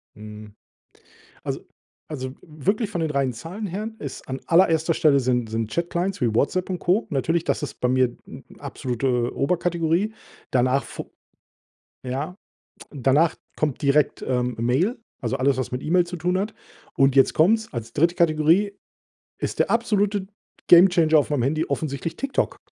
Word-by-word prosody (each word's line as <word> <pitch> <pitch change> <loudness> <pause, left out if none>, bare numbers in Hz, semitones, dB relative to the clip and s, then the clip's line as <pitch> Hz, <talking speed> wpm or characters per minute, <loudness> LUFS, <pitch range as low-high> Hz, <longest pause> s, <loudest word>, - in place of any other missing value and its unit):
Mhm. 105 0 -11 0.9
Also - - -3 0.5
also, 130 -4 -5
wirklich 195 - -2
von 175 -5 -3
den 160 -2 -1
reinen 135 -3 0
Zahlen 170 - -6
her 205 +5 -4
ist 140 - -8
an 130 0 -3
allererster 165 -2 +3
Stelle 145 -3 +4
sind 125 -3 0
sind 115 -1 -2
Chat 170 0 -1
Clients 180 +3 -2
wie 120 -3 +1
WhatsApp 180 - 0
und 180 - -2
Co. 185 +7 +1
Natürlich, 165 +4 0
das 155 - -1
ist - - -9
bei 125 - +1
mir 130 -1 +2
n - - -11 0.2
absolute 125 -1 -2
Oberkategorie. 175 +5 0 0.4
Danach 130 +2 +2
fo - - -8 0.9
ja, 140 +7 -3 0.6
danach 145 +4 +2 0.2
kommt 150 -4 -1
direkt, 140 +1 +2
ähm, 125 -1 0
Mail, 135 - +1 0.2
also, 135 - -1
alles 135 0 +1
was 130 - -2
mit 125 +1 -4
E-Mail 175 +3 +3
zu 175 0 -6
tun 180 +3 0
hat. 205 +3 -3 0.4
Und 135 -1 +3
jetzt 135 - +4
kommt's, 220 +7 +3
als 115 -1 -5
3. 170 +4 +2
Kategorie 170 +5 +3 0.7
ist - - -3
der - - +1
absolute 205 -4 +1 0.4
Gamechanger 170 -3 +6
auf 150 - +1
meinem 140 -5 +1
Handy 155 +5 0
offensichtlich 155 +2 -3
TikTok. 275 +6 -1
155 Hz, 160 wpm, -23 LUFS, 130-180 Hz, 0.9 s, Gamechanger